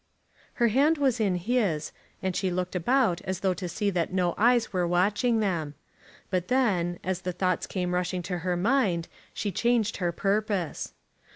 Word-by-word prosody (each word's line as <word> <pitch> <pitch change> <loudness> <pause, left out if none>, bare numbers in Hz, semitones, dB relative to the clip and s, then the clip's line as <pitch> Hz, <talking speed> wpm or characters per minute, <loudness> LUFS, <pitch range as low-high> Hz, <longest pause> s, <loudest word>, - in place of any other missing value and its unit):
Her 235 -2 +2
hand 285 +8 +3
was 265 -4 +1
in 200 -4 +2
his, 180 -5 0 0.3
and 190 -1 -1
she 190 0 0
looked 180 +1 -2
about 215 -1 +2
as 190 -1 -4
though 190 -1 +2
to 180 0 -5
see 205 +2 -1
that 175 -3 -1
no 180 -2 +1
eyes 235 +1 +3
were 180 -2 +1
watching 205 +7 +2
them. 165 -8 -1 0.6
But 180 -1 0
then, 190 -10 +1
as 185 0 -2
the 180 - -2
thoughts 185 0 -1
came 180 -2 -2
rushing 180 0 -1
to 180 0 -3
her 180 +1 -1
mind, 195 -5 +1 0.3
she 205 - -2
changed 230 +2 +1
her 175 -3 0
purpose. 195 -2 -1
185 Hz, 175 wpm, -27 LUFS, 175-220 Hz, 0.6 s, hand